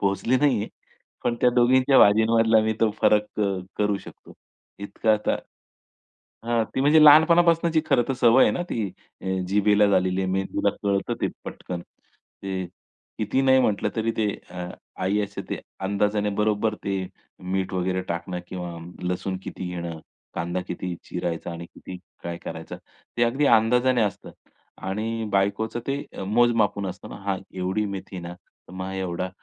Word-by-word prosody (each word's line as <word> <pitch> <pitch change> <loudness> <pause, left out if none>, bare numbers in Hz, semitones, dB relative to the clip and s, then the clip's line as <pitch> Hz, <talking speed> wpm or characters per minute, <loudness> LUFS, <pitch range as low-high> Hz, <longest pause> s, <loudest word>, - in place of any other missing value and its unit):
पोहोचली 100 +5 +1
नाहीये. 125 -7 +2 0.6
पण 120 - +1
त्या 125 - +5
दोघींच्या 130 +2 +5
भाजींमधला 110 +2 +5
मी 110 0 +1
तो 110 - +4
फरक 105 0 +4
क - - +1 0.4
करू 105 -1 +2
शकतो. - - -14 0.5
इतका 100 +2 0
आता 105 0 +1 1.1
हां, 115 -1 +2
ती - - 0
म्हणजे 150 +3 +6
लहानपणापासूनची 165 +2 +6
खरं 120 - +3
तर - - +1
सवय 120 +1 +6
आहे - - +3
ना - - -2
ती 110 -3 -1 0.4
अ, - - -7 0.2
जिभेला 105 +1 +4
झालेली 95 -1 +2
आहे, 95 - -1
मेंदूला 95 +1 0
कळतं 100 -1 0
ते - - +1 0.2
पटकन. 90 -1 -6
ते 95 +1 -8 0.5
कितीही 110 +5 0
नाही 130 0 +5
म्हटलं 105 -5 +1
तरी 115 +1 +1
ते 110 -2 +1 0.2
अ, 90 0 -6 0.3
आई 100 +3 +1
असे 100 0 -7
ते - - -2 0.2
अंदाजाने 105 +2 0
बरोबर 105 0 +1
ते 95 -1 -1 0.5
मीठ 95 -1 -1
वगैरे 95 0 0
टाकणं 85 +1 -3
किंवा 90 -2 -6 0.3
लसूण 90 +1 -2
किती 95 - -6
घेणं, 85 -2 -5 0.4
कांदा 85 +2 -2
किती 90 0 -4
चिरायचा 85 0 -4
आणि 85 0 -7
किती 90 +2 -10 0.3
काय 85 0 -4
करायचं? - - -7 0.4
ते 120 - +1
अगदी 130 +5 +1
अंदाजाने 125 +2 +4
असतं 105 -3 -3 0.6
आणि 110 +3 -2
बायकोचं 100 +4 0
ते 140 +1 -2 0.2
मोज-मापून 110 -2 +2
असतं 90 - -7
ना - - -7
हां, 100 -1 -1 0.2
एवढी 95 +4 0
मेथी 95 0 -8
ना, 85 +1 -7
तर 90 - -22
मग 95 +1 -5
एवढा 90 -1 -3
105 Hz, 155 wpm, -25 LUFS, 95-115 Hz, 1.1 s, म्हणजे